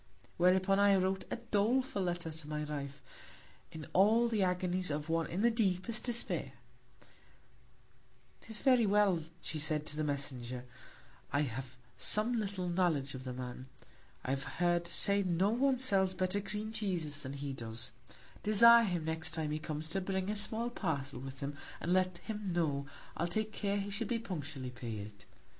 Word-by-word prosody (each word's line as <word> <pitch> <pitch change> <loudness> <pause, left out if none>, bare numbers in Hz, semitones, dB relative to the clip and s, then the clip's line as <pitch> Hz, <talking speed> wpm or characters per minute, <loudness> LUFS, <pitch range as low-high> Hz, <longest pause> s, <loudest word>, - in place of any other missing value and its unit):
Whereupon 185 +2 +4
I 200 -1 +6
wrote 190 0 0
a - - -2
doleful 235 0 0
Letter 175 -2 -2
to 155 -1 -8
my 150 0 -2
Wife, 140 -2 -6 0.7
in 155 -2 -8
all 220 +5 +5
the 220 -3 0
Agonies 180 -1 0
of 150 +2 -3
one 165 0 +1
in 185 +6 -2
the 235 - +5
deepest 220 0 0
Despair: 235 -2 0 1.9
'Tis 220 -1 -6
very 250 -2 +4
well, 200 -2 +4 0.3
said 155 -1 0
she, - - -15
to 150 - -1
the 155 - -1
Messenger; 130 -4 -4 0.7
I 140 - +2
have 130 -1 -4 0.2
some 215 +3 +6
little 195 -3 -3
Knowledge 170 -6 +1
of 130 0 -8
the 130 - -4
Man; 125 +1 -7 0.6
I 130 - -1
have 135 0 -1
heard 175 0 +2
say 200 +3 +2
no 185 +2 +1
one 260 +3 +2
sells 195 -7 +3
better 185 +2 0
Cream 210 +2 -4
Cheeses 175 -9 -2
than 130 0 -5
he 140 0 -4
does; 120 0 -6 0.5
desire 235 +2 +8
him, 175 -5 -2
next 160 +1 -1
Time 155 -2 -2
he 155 - -2
comes, 155 0 -5
to 195 - 0
bring 190 +1 -2
a - - -2
small 220 +3 -1
Parcel 140 - -3
with 135 0 -8
him, 140 +1 -4 0.2
and 175 - 0
let 185 -1 +2
him 210 -1 -5
know, 145 -5 0 0.3
I'll 170 - -1
take 215 +5 -1
care 200 -1 -1
he 200 0 -3
shall 215 +3 -2
be 240 - 0
punctually 150 - -5
paid. 105 -4 -7
180 Hz, 170 wpm, -33 LUFS, 145-205 Hz, 1.9 s, desire